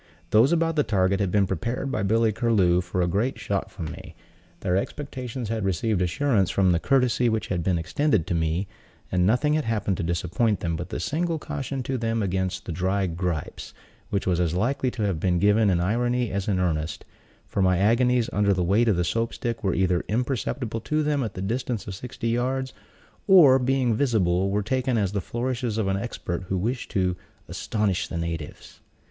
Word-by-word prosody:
Those 115 +7 +5
about 165 -1 +1
the 150 - +4
target 95 -3 +1
had 100 -3 +1
been 100 +1 +3
prepared 115 +9 -3
by 110 - -1
Billy 110 +3 +2
Curlew 95 -6 +2
for 90 0 -1
a - - +1
great 110 +8 0
shot 100 -4 -2
from 80 -2 -6
me; - - -10 0.5
their 90 -1 0
expectations 125 +1 -4
had 110 -2 -2
received 95 +2 0
assurance 100 +1 +1
from 95 -2 +3
the 85 - +2
courtesy 125 0 +2
which 110 -1 -2
had 90 -3 -1
been 90 +1 +1
extended 100 - +1
to - - -2
me; 85 +3 0 0.4
and 90 0 +2
nothing 135 +7 +2
had 155 -1 0
happened 105 -4 -1
to 100 - -2
disappoint 90 +5 0
them 85 -1 -1
but 90 +2 -5
the - - -4
single 165 +2 -1
caution 135 -3 -4
to 130 0 -2
them 115 -1 0
against 95 -1 -2
the - - -5
"dry 95 +4 0
gripes," 85 -3 -4 0.3
which 100 - -1
was 90 -2 +1
as 85 -1 0
likely 125 +6 0
to 120 -3 -4
have 95 -6 0
been 90 +1 +1
given 105 +3 +4
in 90 -2 +2
irony 120 +5 0
as 100 -1 -2
in 95 -3 +1
earnest; 80 -3 -2 0.4
for 100 - -2
my 90 -1 +3
agonies 120 +4 +3
under 105 -1 +3
the 90 - 0
weight 105 +7 +3
of 105 -5 +3
the 90 - +2
Soap 115 +6 -1
stick 115 -2 -4
were 95 -3 +1
either 90 -1 +1
imperceptible 120 0 -2
to 155 0 0
them 150 -1 +1
at 110 -5 -4
the 95 - -4
distance 120 +1 -2
of 100 - -6
sixty 115 +3 -5
yards, 130 +3 -1 0.5
or, 155 -9 +7
being 130 -2 +1
visible, 100 -7 +1
were 100 +1 0
taken 130 +2 0
as 100 -4 +1
the 100 -1 -1
flourishes 120 +1 -2
of 110 -3 0
an 95 0 +1
expert 95 -5 -4
who 95 - -1
wished 120 +7 -2
to 90 -2 0 0.3
"astonish 105 -4 -1
the - - -5
natives." 85 -2 -6
105 Hz, 200 wpm, -25 LUFS, 90-125 Hz, 0.5 s, or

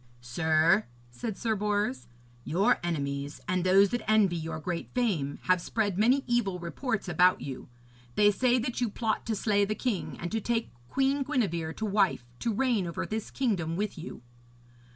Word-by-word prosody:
'Sir,' 160 - +2 0.3
said 155 - -5
Sir 225 -2 0
Bors, 205 - -1 0.4
'your 185 +9 +2
enemies 140 -4 -3
and 185 -1 0
those 195 +2 +5
that 240 +2 -2
envy 210 -5 +4
your 160 -1 -4
great 170 +2 -4
fame 180 - 0
have 185 -1 +3
spread 205 -1 -1
many 255 +6 +4
evil 240 -7 0
reports 200 +6 -3
about 180 +2 +4
you. 130 -2 -7 0.5
They 205 0 +5
say 245 +4 +2
that 250 0 -2
you 240 - +1
plot 220 +2 -2
to 225 - 0
slay 205 0 +2
the 210 +2 -1
king 230 -7 -2
and 175 - -4
to 225 0 -1
take 230 +1 -1 0.2
Queen 275 - +1
Gwenevere 170 -12 -1
to 220 - -3
wife, 195 - +1
to 235 - 0
reign 225 -4 +1
over 175 +2 -3
this 215 +4 -4
kingdom 185 -11 -1
with 205 +3 -2
you.' 160 -7 -9
200 Hz, 175 wpm, -29 LUFS, 170-225 Hz, 0.5 s, those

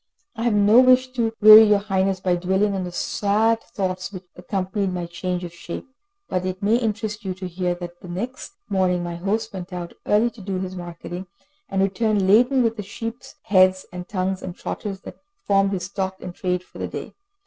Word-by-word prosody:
I - - -6
have 235 -3 +2
no 210 +3 +6
wish 255 0 +5
to 235 -3 0
weary 215 +1 +11
your 210 -1 +5
Highness 195 -2 0
by 185 -1 +1
dwelling 190 +3 +1
on 190 -2 -2
the 180 - -6
sad 215 +5 +1
thoughts 185 -4 -4
which 185 -2 -8
accompanied 190 +1 -2
my 180 -1 -3
change 180 +1 -3
of 170 -1 -7
shape, 175 +7 -7 0.4
but 185 -1 -1
it 185 +1 -4
may 215 +3 +4
interest 220 -2 -2
you 190 -2 -3
to 185 0 -6
hear 180 0 -2
that 175 0 -9
the 185 - -10
next 235 - -5
morning 180 -2 +1
my 170 -1 -4
host 215 +5 -2
went 185 -1 -7
out 175 -1 -6
early 220 +3 +3
to 225 -1 -14
do 190 0 -3
his 185 0 -4
marketing, 175 +1 -7 0.4
and 195 0 +1
returned 200 0 +1
laden 245 +6 +5
with 230 -1 0
the - - -3
sheep's 225 +7 -7
heads, 185 -1 +4
and 180 0 -7
tongues 190 -1 -1
and 180 -1 -6
trotters 195 -1 -5
that - - -11 0.2
formed 195 -1 +3
his 185 -3 -2
stock 190 0 -4
in 180 - -7
trade 180 0 -2
for - - -14
the - - -2
day. - - -7
190 Hz, 205 wpm, -23 LUFS, 180-215 Hz, 0.4 s, weary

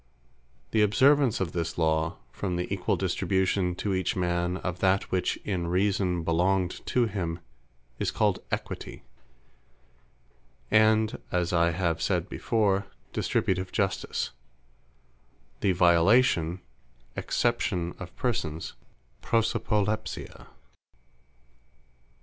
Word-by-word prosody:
The 110 - +3
observance 130 +4 +4
of 90 -3 -1
this 85 -2 -3
law, 80 +1 +1
from 95 -3 -3
the 90 0 -2
equall 100 +2 0
distribution 95 0 0
to 100 +2 -2
each 95 -2 0
man, 90 0 0
of 90 -1 -4
that 95 +1 +1
which 95 -1 0
in 90 -4 -1
reason 90 -1 +1
belongeth 90 +3 +1
to 125 -2 +2
him, 90 -6 -3 0.6
is - - 0
called - - +1
EQUITY, - - -5 1.7
and 110 0 +4
(as 90 0 0
I 85 0 +4
have 85 -1 -1
sayd - - 0
before) 100 -3 +1 0.3
distributive 95 0 0
justice: 100 -3 -1 1.3
the 100 - +2
violation, 90 0 +4 0.5
Acception 95 -8 0
Of 90 - -8
Persons, 85 -10 -2 0.5
Prosopolepsia. 105 -2 -1
95 Hz, 100 wpm, -27 LUFS, 85-105 Hz, 1.7 s, observance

